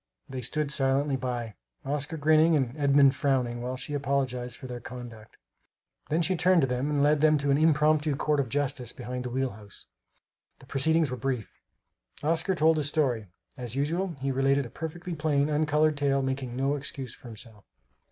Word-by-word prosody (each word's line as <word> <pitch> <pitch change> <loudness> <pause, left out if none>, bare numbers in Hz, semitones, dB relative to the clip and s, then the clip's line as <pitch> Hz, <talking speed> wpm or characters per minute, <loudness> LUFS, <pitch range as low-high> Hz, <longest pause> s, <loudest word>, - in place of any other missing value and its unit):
They 130 -2 -5
stood 145 +4 -1
silently 135 +1 +2
by, 120 -4 -3 0.3
Oscar 145 +3 -3
grinning 155 +2 +4
and 130 -3 0
Edmund 140 -2 +5
frowning, 125 -4 0
while 125 +1 -3
she 145 - -5
apologized 130 -3 -1
for - - -10
their 125 -1 -6
conduct. 120 -3 -10 0.7
Then 165 +3 +1
she 185 +3 +1
turned 180 0 +4
to 135 - +2
them 125 +3 -1
and 145 -1 +1
led 150 0 +3
them 155 -1 +5
to 140 0 0
an 140 - +4
impromptu 155 -1 +3
court 150 +1 0
of 130 -4 -1
justice 130 -3 -2
behind 125 0 -6
the - - -3
wheel 130 +1 -1
house. 100 -1 -13 0.7
The - - -17
proceedings 155 +3 +1
were 125 - -3
brief. 125 -3 -3 0.7
Oscar 165 +4 +1
told 160 -1 +4
his 150 -2 0
story. 125 -9 0 0.3
As 125 -3 -5
usual, 165 +6 -1
he 135 +1 -1
related 135 +1 +2
a 120 - -10
perfectly 170 +2 -6
plain, 150 -2 +1
uncolored 150 0 +2
tale, 140 -1 +1
making 130 -2 -3
no 135 +2 +1
excuse 135 -3 -6
for - - -14
himself. 110 -2 -12
140 Hz, 180 wpm, -28 LUFS, 125-150 Hz, 0.7 s, Edmund